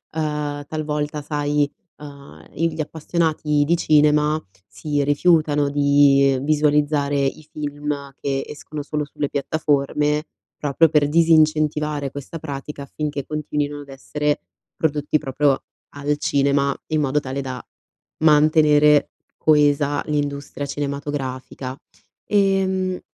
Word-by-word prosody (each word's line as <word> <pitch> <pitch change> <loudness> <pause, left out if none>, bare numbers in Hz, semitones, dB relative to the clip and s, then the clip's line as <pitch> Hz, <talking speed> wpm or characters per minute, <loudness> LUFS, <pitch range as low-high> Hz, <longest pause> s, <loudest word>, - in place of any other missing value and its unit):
uhm, 150 -2 -2
talvolta 150 -1 -3
sai, 145 0 0 0.3
uhm, 140 - -12
i 165 0 -1
gli 155 - -3
appassionati 155 -1 0
di 170 +3 +2
cinema 150 0 +3 0.3
si 145 +4 -2
rifiutano 150 -1 +3
di 140 -1 +4
visualizzare 145 -1 +2
i 140 +3 -1
film 145 -1 -4
che, 135 -1 -2
escono 150 0 -7
solo 150 0 -3
sulle 145 0 -4
piattaforme, 150 +1 0 0.3
proprio 150 +3 +3
per 150 -1 +3
disincentivare 155 -3 +2
questa 145 +4 -7
pratica, 145 -1 -7
affinché 145 -1 -4
continuino 150 -1 -3
ad 145 - -10
essere 145 - -2 0.3
prodotti 150 -1 0
proprio 140 -1 0 0.3
al 145 +1 -1
cinema, 140 -1 +1
in 155 -1 0
modo 145 +1 +1
tale 135 +1 -4
da, 130 -2 -6 0.6
mantenere 150 -1 +5 0.3
coesa 145 -1 +2
l'industria 145 -1 -3
cinematografica, 140 -2 -4 0.5
ehm 190 -2 +1
150 Hz, 110 wpm, -21 LUFS, 140-150 Hz, 0.6 s, mantenere